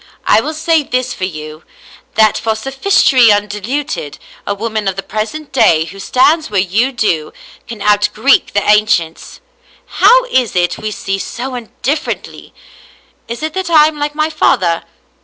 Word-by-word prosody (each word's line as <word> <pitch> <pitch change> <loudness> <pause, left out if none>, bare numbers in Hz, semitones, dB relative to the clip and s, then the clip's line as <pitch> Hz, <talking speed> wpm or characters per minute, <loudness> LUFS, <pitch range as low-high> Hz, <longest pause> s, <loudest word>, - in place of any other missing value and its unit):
I - - +4
will 310 - -5
say 320 0 +1
this 255 -2 -2
for 185 - -3
you 155 -3 -8 0.3
— - - -24
that 215 -1 +4
for 220 -1 -1
sophistry 265 - +3
undiluted, 205 - -3 0.3
a 200 - -1
woman 215 0 -3
of 190 - -1
the 195 - -5
present 255 +8 -5
day 160 -11 +3
who 190 +4 -11
stands 300 +9 +2
where 205 -2 0
you 205 +8 +1
do, 175 - -1 0.4
can 225 -4 -7
out 205 0 +3
Greek 265 +6 +2
the 205 0 0
ancients. 210 -6 +1 0.4
How 480 +6 +4
is 255 - 0
it 175 -1 0
we 215 - -4
see 195 -2 -4
so 250 +6 -5 0.3
differ 290 +4 0
ently? - - -14 0.8
Is 235 +5 -6
it 315 0 -3
that 375 -1 -3
I 310 -3 +6
am 305 -1 -10
like 295 0 -3
my 310 +1 0
father? 175 - +1
220 Hz, 170 wpm, -14 LUFS, 195-290 Hz, 0.8 s, I